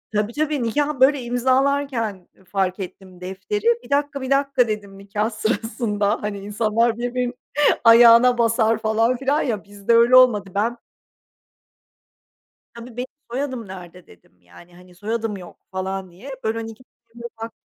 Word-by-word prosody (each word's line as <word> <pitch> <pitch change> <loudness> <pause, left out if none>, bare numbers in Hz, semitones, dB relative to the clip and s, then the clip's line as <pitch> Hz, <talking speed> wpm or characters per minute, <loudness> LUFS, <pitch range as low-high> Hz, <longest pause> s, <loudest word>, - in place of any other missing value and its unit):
Tabii, 210 +2 0
tabii, 295 -3 -1
nikâh, 290 +4 -1
böyle, 270 0 +4
imzalarken 250 -4 0 0.2
fark 190 0 -1
ettim 185 -1 -9
defteri. 190 - -5 0.2
"1 - - -15
dakika, 285 -1 0
1 260 - -5
dakika!" 275 -3 +2
dedim 205 -2 -5
nikâh 205 +2 -2
sırasında. 215 -1 -2
Hani 210 -1 -3
insanlar 220 +3 0
birbirine 245 0 -2 0.5
ayağına 235 +1 +7
basar 230 -1 +2
falan 225 +3 +1
filan 275 +3 0
ya 220 -7 -2
bizde 205 +2 -2
öyle 235 +2 +5
olmadı. 225 -6 +5
Ben 230 +4 0 2.0
Tabii, 235 0 -11
"Benim 250 +1 -3 0.2
soyadım 255 -3 -4
nerede?" 180 -1 -11
dedim 90 +1 -22
yani 90 - -18
hani 180 0 -17
"Soyadım 220 +2 -3
yok" 180 -2 -12
falan 190 0 -4
diye. 210 +11 -12
Böyle, 220 +1 -1
hani 225 0 -5
2 225 +3 -14 0.3
kere 235 - -11 0.2
baktım 225 - -4
225 Hz, 145 wpm, -21 LUFS, 200-250 Hz, 2.0 s, ayağına